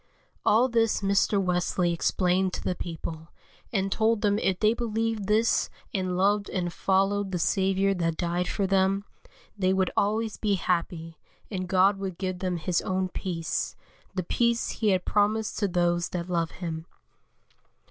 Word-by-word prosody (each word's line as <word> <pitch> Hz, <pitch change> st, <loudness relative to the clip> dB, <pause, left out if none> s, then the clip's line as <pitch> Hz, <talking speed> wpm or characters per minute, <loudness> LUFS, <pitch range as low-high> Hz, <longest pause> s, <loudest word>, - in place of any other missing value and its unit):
All 235 Hz, +4 st, +4 dB
this 230 Hz, -4 st, +1 dB
Mr. 200 Hz, +1 st, +2 dB
Wesley 180 Hz, -1 st, +1 dB
explained 180 Hz, +2 st, +1 dB
to -, -, -4 dB
the -, -, 0 dB
people, 165 Hz, -2 st, -6 dB, 0.4 s
and 195 Hz, -2 st, 0 dB
told 220 Hz, 0 st, +2 dB
them 205 Hz, 0 st, +2 dB
if 190 Hz, -4 st, 0 dB
they 215 Hz, 0 st, +4 dB
believed 225 Hz, -3 st, -2 dB
this 220 Hz, +2 st, +2 dB, 0.2 s
and 185 Hz, -3 st, -1 dB
loved 200 Hz, +2 st, +2 dB
and 175 Hz, -2 st, -2 dB
followed 195 Hz, +2 st, +1 dB
the 180 Hz, -, -1 dB
Saviour 195 Hz, +3 st, +2 dB
that 165 Hz, -3 st, -1 dB
died 175 Hz, +1 st, -1 dB
for 200 Hz, -, -1 dB
them, 195 Hz, +1 st, +2 dB, 0.5 s
they 190 Hz, -2 st, +1 dB
would 190 Hz, -1 st, +1 dB
always 215 Hz, +1 st, 0 dB
be 205 Hz, -2 st, +1 dB
happy, 170 Hz, -3 st, -2 dB, 0.3 s
and 185 Hz, -3 st, -3 dB
God 195 Hz, +2 st, +4 dB
would 190 Hz, -3 st, -4 dB
give 185 Hz, -1 st, -3 dB
them 180 Hz, -2 st, -1 dB
His 170 Hz, +1 st, 0 dB
own 185 Hz, 0 st, -1 dB
peace, 170 Hz, -3 st, -3 dB, 0.4 s
the 185 Hz, -, -1 dB
peace 235 Hz, +6 st, +1 dB
He 220 Hz, -, -2 dB
has 185 Hz, -2 st, +3 dB
promised 215 Hz, +1 st, +1 dB
to 205 Hz, -, +2 dB
those 175 Hz, -1 st, +1 dB
that 175 Hz, -1 st, -4 dB
love 170 Hz, -2 st, +1 dB
Him. 165 Hz, -2 st, -6 dB
190 Hz, 160 wpm, -27 LUFS, 180-205 Hz, 0.5 s, All